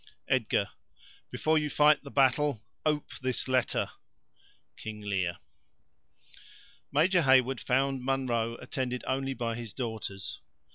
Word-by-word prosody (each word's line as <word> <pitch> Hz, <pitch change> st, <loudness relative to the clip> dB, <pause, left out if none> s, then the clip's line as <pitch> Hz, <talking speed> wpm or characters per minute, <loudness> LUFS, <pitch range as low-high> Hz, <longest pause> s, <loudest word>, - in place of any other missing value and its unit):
"EDG.—Before 155 Hz, 0 st, -1 dB
you 150 Hz, -1 st, -1 dB
fight 150 Hz, 0 st, +5 dB
the 140 Hz, -, -8 dB
battle 135 Hz, -3 st, +2 dB, 0.2 s
ope 150 Hz, -1 st, 0 dB
this 130 Hz, 0 st, -1 dB
letter." 130 Hz, -1 st, +1 dB, 0.9 s
—Lear 100 Hz, -5 st, -2 dB, 1.5 s
Major 170 Hz, +6 st, +4 dB
Heyward 130 Hz, -3 st, +4 dB
found 135 Hz, 0 st, +1 dB
Munro 120 Hz, -4 st, 0 dB
attended 125 Hz, 0 st, -3 dB
only 135 Hz, 0 st, -1 dB
by 115 Hz, -2 st, -2 dB
his 115 Hz, -3 st, -6 dB
daughters. 110 Hz, -6 st, -5 dB
130 Hz, 100 wpm, -30 LUFS, 115-140 Hz, 1.5 s, fight